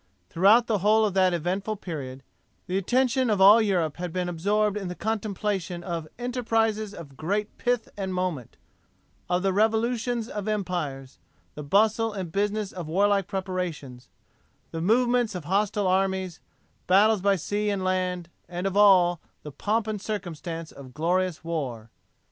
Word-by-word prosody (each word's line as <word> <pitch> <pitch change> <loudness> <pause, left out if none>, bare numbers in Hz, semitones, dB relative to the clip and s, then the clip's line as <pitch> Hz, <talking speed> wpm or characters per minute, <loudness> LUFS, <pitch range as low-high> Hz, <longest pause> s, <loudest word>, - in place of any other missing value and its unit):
Throughout 205 +7 +5
the 215 -4 0
whole 215 +3 +4
of 205 - -1
that 190 -1 +3
eventful 185 +5 -2
period, 135 -9 -7 0.4
the 180 - -3
attention 250 +5 +1
of 210 -2 +1
all 205 +4 +8
Europe 175 -8 0
had 180 -1 -4
been 180 +1 -2
absorbed 200 +5 0
in 200 -3 -4
the 180 - -5
contemplation 200 -5 -3
of 170 -3 -4
'enterprises 225 -3 0
of 140 -5 -11
great 205 +8 -2
pith 245 -2 0
and 195 -2 -4
moment,' 180 -9 -3 0.7
of 180 +1 +1
the 195 -1 +1
revolutions 225 +2 +1
of 210 -2 -5
empires 175 -10 -3 0.3
the 150 - -7
bustle 215 +8 +2
and 185 -5 -5
business 205 +1 -1
of 175 -4 -7
warlike 200 +3 +2
preparations 180 -10 -5 0.6
the 165 - -4
movements 240 +2 +2
of 175 -5 -6
hostile 205 +3 0
armies 190 -1 0 0.5
battles 205 +2 +4
by 200 0 +3
sea 205 +4 -2
and 200 -2 -1
land, 185 -2 -1 0.2
and 180 +1 -4
of 195 0 -1
all 185 -4 +5 0.2
'the 150 - -7
pomp 215 +8 -1
and 215 -2 -4
circumstance 170 -5 -5
of 130 -3 -13
glorious 175 +1 0
war.' 130 -9 -4
190 Hz, 155 wpm, -26 LUFS, 175-210 Hz, 0.7 s, all